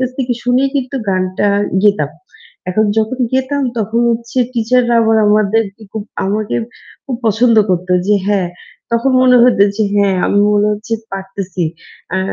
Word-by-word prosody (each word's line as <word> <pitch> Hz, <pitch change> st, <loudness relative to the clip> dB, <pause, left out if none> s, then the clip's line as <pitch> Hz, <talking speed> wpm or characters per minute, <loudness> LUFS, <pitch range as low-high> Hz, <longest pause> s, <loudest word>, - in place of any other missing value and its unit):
কাছ 255 Hz, -1 st, -1 dB
থেকে 255 Hz, -2 st, 0 dB
শুনেই 255 Hz, +2 st, +2 dB
কিন্তু 270 Hz, 0 st, -3 dB
গানটা 185 Hz, +1 st, 0 dB, 0.4 s
গেতাম। 155 Hz, -9 st, +2 dB, 0.6 s
এখন 215 Hz, +4 st, +1 dB
যখন 220 Hz, +4 st, -1 dB
গেতাম 265 Hz, +2 st, 0 dB, 0.2 s
তখন 220 Hz, +2 st, -1 dB
হচ্ছে 235 Hz, +2 st, -3 dB
টিচাররা 240 Hz, +1 st, +1 dB
আবার 225 Hz, 0 st, +3 dB
আমাদেরকে 210 Hz, 0 st, +1 dB
খুব 220 Hz, -, -4 dB, 0.2 s
আমাকে 210 Hz, +1 st, -1 dB, 0.5 s
খুব 260 Hz, -3 st, -4 dB
পছন্দ 225 Hz, +2 st, +3 dB
করতো 180 Hz, 0 st, -1 dB
যে 210 Hz, -, +3 dB
হ্যাঁ, 195 Hz, -4 st, +1 dB, 0.4 s
তখন 235 Hz, +3 st, +1 dB
মনে 250 Hz, -1 st, +5 dB
হতো 245 Hz, -5 st, +4 dB
যে 215 Hz, -, +1 dB
হ্যাঁ 200 Hz, -2 st, +2 dB
আমি 205 Hz, -, +2 dB
মনে 205 Hz, 0 st, +2 dB
হচ্ছে 215 Hz, +2 st, -6 dB, 0.2 s
পারতেছি। 190 Hz, -2 st, -5 dB, 0.5 s
আ 190 Hz, -, +1 dB
220 Hz, 150 wpm, -15 LUFS, 200-245 Hz, 0.6 s, মনে